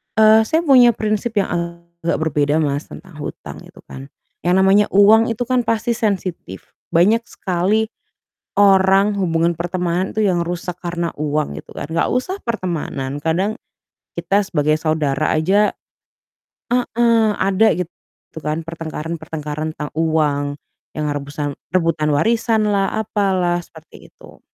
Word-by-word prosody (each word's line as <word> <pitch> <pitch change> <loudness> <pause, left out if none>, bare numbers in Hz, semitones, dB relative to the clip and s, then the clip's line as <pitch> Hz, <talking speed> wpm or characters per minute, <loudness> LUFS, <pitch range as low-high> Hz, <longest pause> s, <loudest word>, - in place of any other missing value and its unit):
eee, 220 0 +6
saya 320 +6 +1
punya 250 -6 +6
prinsip 215 +2 -2
yang 200 - +1
agak 170 0 -3
berbeda 145 -1 +1
Mas, 145 0 -2
tentang 180 -5 -12
hutang 145 - -7
itu - - -17
kan, 135 +1 -10 0.4
yang 180 - +4
namanya 195 +2 +4
uang 220 +3 +6
itu 230 +1 -2
kan 250 0 0
pasti 230 +1 0
sensitif. 190 - -3 0.2
Banyak 205 +8 +2
sekali 200 +5 -1 0.7
orang 195 0 +5
hubungan 170 -2 +1
pertemanan 175 +2 -2
itu 220 - 0
yang 175 -3 +1
rusak 175 +1 -4
karena 170 -1 -3
uang 150 0 -2
gitu - - -18
kan, - - -5
nggak 165 +1 0
usah 310 +11 -1
pertemanan 165 - -3
kadang 185 +7 0 0.6
kita 195 +4 +1
sebagai 155 -5 +1
saudara 155 -2 0
aja 195 +7 +2 1.0
heeh, 235 -2 +2
ada 195 +3 +3
gitu 180 -2 -3 0.6
kan 155 +1 -1
pertengkaran-pertengkaran 160 -1 -5
tentang 150 -1 -6
uang 150 -3 0 0.4
yang 150 -1 -3
rebusan 145 0 -4 0.2
rebutan 165 -4 +1
warisanlah, 215 +2 +1
apalah, 190 -5 0
seperti 160 -1 -16
itu. - - -17
175 Hz, 130 wpm, -19 LUFS, 155-210 Hz, 1.0 s, eee